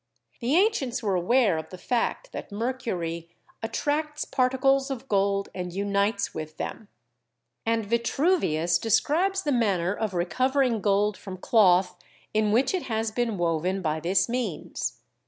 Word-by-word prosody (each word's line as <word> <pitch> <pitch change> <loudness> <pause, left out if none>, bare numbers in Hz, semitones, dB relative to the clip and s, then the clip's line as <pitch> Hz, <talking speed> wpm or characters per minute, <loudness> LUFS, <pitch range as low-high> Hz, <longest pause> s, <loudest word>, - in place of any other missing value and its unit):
The 255 +4 +1
ancients 340 - +2
were 200 -3 +1
aware 190 0 +3
of 160 0 -8
the 185 - -9
fact 245 - -1
that - - -7
mercury 200 -8 -3 0.3
"attracts 300 +6 -2
particles 270 +1 +2
of 265 -1 -5
gold 200 -1 +1
and 180 -1 -4
unites 200 +2 0
with 155 0 -7
them," 215 - -5 0.8
and 225 -1 +1
Vitruvius 230 - +1
describes 325 - +1
the 295 - 0
manner 195 -8 +1
of 210 -3 -3
recovering 255 +6 +1
gold 205 0 +2
from 190 -2 -8
cloth 185 -3 +4 0.4
in 215 -1 +2
which 245 - +2
it 370 - 0
has 220 0 -1
been 230 -2 -1
woven 175 +3 0
by 155 -1 0
this 185 +3 +2
means. 230 -10 -3
215 Hz, 140 wpm, -26 LUFS, 185-255 Hz, 0.8 s, cloth